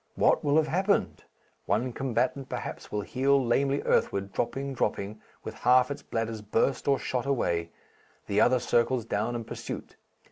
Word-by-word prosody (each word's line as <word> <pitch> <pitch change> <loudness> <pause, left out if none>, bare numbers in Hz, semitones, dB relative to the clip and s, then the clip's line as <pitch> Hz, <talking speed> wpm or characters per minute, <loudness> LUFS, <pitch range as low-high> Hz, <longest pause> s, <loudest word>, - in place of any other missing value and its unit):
What - - +3
will 145 +1 +3
have 160 - +4
happened? 175 - 0 0.4
One 115 +6 0
combatant, 130 +1 -1
perhaps, - - -6
will 105 - -1
heel 135 +6 +2
lamely 135 +4 +1
earthward, 100 0 +1
dropping, 135 +3 -2
dropping, 105 -3 -2 0.2
with - - -6
half 125 +2 +4
its 140 - -5
bladders 115 -1 -3
burst 115 +7 0
or 140 -1 +4
shot 125 0 -3
away, 85 -11 0 0.6
the 100 +1 +2
other 130 - +5
circles 120 0 +1
down 110 +2 -1
in 115 - -3
pursuit.... - - -7
120 Hz, 155 wpm, -28 LUFS, 105-135 Hz, 0.6 s, other